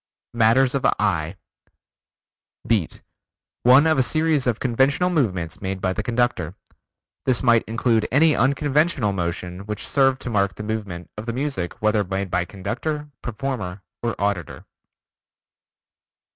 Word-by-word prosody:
Matters 120 Hz, +3 st, +4 dB
of 140 Hz, -, -1 dB
Eye 85 Hz, -7 st, 0 dB, 1.3 s
Beat: 105 Hz, -8 st, -1 dB, 0.6 s
One 130 Hz, +5 st, +6 dB
of 160 Hz, -3 st, +3 dB
a -, -, +6 dB
series 155 Hz, 0 st, +1 dB
of 115 Hz, -3 st, 0 dB
conventional 135 Hz, +8 st, +2 dB
movements 95 Hz, -, -1 dB
made 95 Hz, -1 st, -3 dB
by 95 Hz, 0 st, 0 dB
the 110 Hz, -, -2 dB
conductor. 115 Hz, -7 st, -1 dB, 0.7 s
This 130 Hz, -1 st, +2 dB
might 120 Hz, -2 st, +5 dB
include 115 Hz, -1 st, +1 dB
any 150 Hz, +4 st, +4 dB
unconventional 140 Hz, -2 st, +2 dB
motion 90 Hz, 0 st, -3 dB
which 105 Hz, -1 st, -4 dB
served 135 Hz, -2 st, +3 dB
to 125 Hz, -, -4 dB
mark 100 Hz, -2 st, +1 dB
the 105 Hz, -, -7 dB
movement 105 Hz, -5 st, -5 dB
of 110 Hz, -, -8 dB
the 115 Hz, -, -2 dB
music, 130 Hz, -7 st, -3 dB
whether 110 Hz, -1 st, +3 dB
made 95 Hz, 0 st, -3 dB
by 90 Hz, -1 st, +1 dB
conductor, 145 Hz, -, -4 dB
performer 105 Hz, -6 st, -4 dB, 0.2 s
or 120 Hz, -1 st, -3 dB
auditor. 100 Hz, -6 st, -2 dB
115 Hz, 135 wpm, -23 LUFS, 95-135 Hz, 1.3 s, One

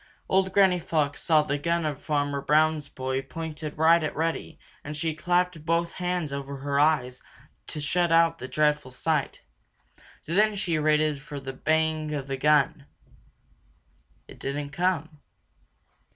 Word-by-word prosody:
Old 190 Hz, 0 st, +2 dB
Granny 190 Hz, -2 st, +4 dB
Fox 155 Hz, -4 st, -1 dB
saw 155 Hz, -3 st, +4 dB
the 145 Hz, -1 st, -2 dB
gun 170 Hz, +2 st, 0 dB
of 150 Hz, -3 st, -3 dB
Farmer 145 Hz, -2 st, -1 dB
Brown's 155 Hz, +1 st, +2 dB
boy 130 Hz, 0 st, -3 dB
pointed 155 Hz, +2 st, -6 dB
right 165 Hz, +2 st, +5 dB
at 150 Hz, -, -3 dB
Reddy 165 Hz, +1 st, -2 dB, 0.3 s
and 150 Hz, +1 st, -6 dB
she 160 Hz, 0 st, -1 dB
clapped 175 Hz, 0 st, 0 dB
both 170 Hz, +1 st, 0 dB
hands 180 Hz, -5 st, -2 dB
over 140 Hz, 0 st, -5 dB
her 140 Hz, +1 st, -1 dB
eyes 135 Hz, -5 st, +2 dB, 0.5 s
to -, -, -4 dB
shut 170 Hz, +4 st, 0 dB
out 165 Hz, 0 st, +4 dB
the 130 Hz, -, -6 dB
dreadful 150 Hz, -1 st, +1 dB
sight. 145 Hz, +3 st, -2 dB, 0.8 s
Then 210 Hz, +6 st, +2 dB
she 170 Hz, -5 st, -1 dB
waited 150 Hz, -1 st, +2 dB
for 145 Hz, 0 st, -7 dB
the 135 Hz, -1 st, -7 dB
bang 155 Hz, +1 st, 0 dB
of 140 Hz, -2 st, -4 dB
the 135 Hz, -1 st, -4 dB
gun. 145 Hz, 0 st, +2 dB, 1.4 s
It -, -, -14 dB
didn't 140 Hz, +1 st, -4 dB
come. 160 Hz, -1 st, -1 dB
155 Hz, 150 wpm, -26 LUFS, 145-165 Hz, 1.4 s, right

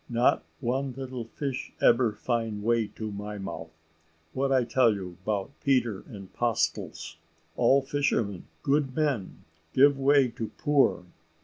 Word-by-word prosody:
not 120 Hz, +1 st, +2 dB, 0.2 s
one 130 Hz, +2 st, -1 dB
little 130 Hz, -2 st, -6 dB
fish 135 Hz, +2 st, -4 dB
ebber 120 Hz, -1 st, +4 dB
find 115 Hz, -2 st, -2 dB
way 115 Hz, -1 st, +2 dB
to 110 Hz, 0 st, -6 dB
my 105 Hz, +1 st, -6 dB
mouth. 85 Hz, -4 st, -6 dB, 0.6 s
What 135 Hz, +1 st, 0 dB
I 130 Hz, -2 st, +4 dB
tell 120 Hz, -2 st, +3 dB
you 90 Hz, -3 st, -7 dB
'bout 100 Hz, +2 st, -2 dB
Peter 125 Hz, -7 st, +1 dB
and 100 Hz, -3 st, -11 dB
'postles 115 Hz, -7 st, -1 dB, 0.4 s
all 130 Hz, +3 st, +4 dB
fishermen? 135 Hz, -9 st, -1 dB, 0.2 s
good 140 Hz, -2 st, +1 dB
men; 140 Hz, -11 st, -1 dB, 0.3 s
give 140 Hz, +1 st, +5 dB
'way 135 Hz, -1 st, +4 dB
to 115 Hz, -1 st, -5 dB
poor. 140 Hz, -11 st, +2 dB
120 Hz, 135 wpm, -28 LUFS, 105-135 Hz, 0.6 s, give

